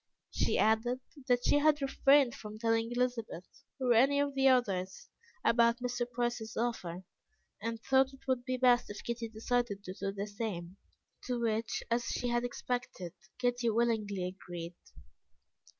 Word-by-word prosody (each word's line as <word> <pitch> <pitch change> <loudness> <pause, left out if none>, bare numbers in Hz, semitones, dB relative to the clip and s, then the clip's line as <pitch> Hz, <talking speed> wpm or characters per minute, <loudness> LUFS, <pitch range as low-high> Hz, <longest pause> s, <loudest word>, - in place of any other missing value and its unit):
She - - +1
added, 225 +3 +2 0.3
that 245 -1 +2
she 290 - +4
had 300 0 +4
refrained 275 -1 +4
from 210 0 -9
telling 225 +1 +1
Elizabeth, 240 -7 -2 0.3
or 250 -2 +3
any 270 +5 +4
of 285 0 +1
the 270 0 +3
others, 195 -8 +1 0.4
about 235 0 +4
Mr. 245 -1 -2
Price's 240 -2 -3
offer, 190 -7 -2 0.6
and 230 0 -3
thought 265 0 +3
it 270 0 -17
would 255 -2 +1
be 255 0 -2
best 245 -1 +4
if 205 - -7
Kitty 235 -1 -3
decided 225 -2 -1
to 185 - -6
do 195 0 -3
the 200 0 -4
same, 200 -4 -5 0.5
to 250 -1 -1
which, 225 0 -1
as 235 0 +1
she 245 - -2
had 240 0 +1
expected, 245 -7 -4 0.2
Kitty 245 -1 +1
willingly 215 -4 0
agreed. 175 -2 -7
235 Hz, 150 wpm, -32 LUFS, 215-250 Hz, 0.6 s, she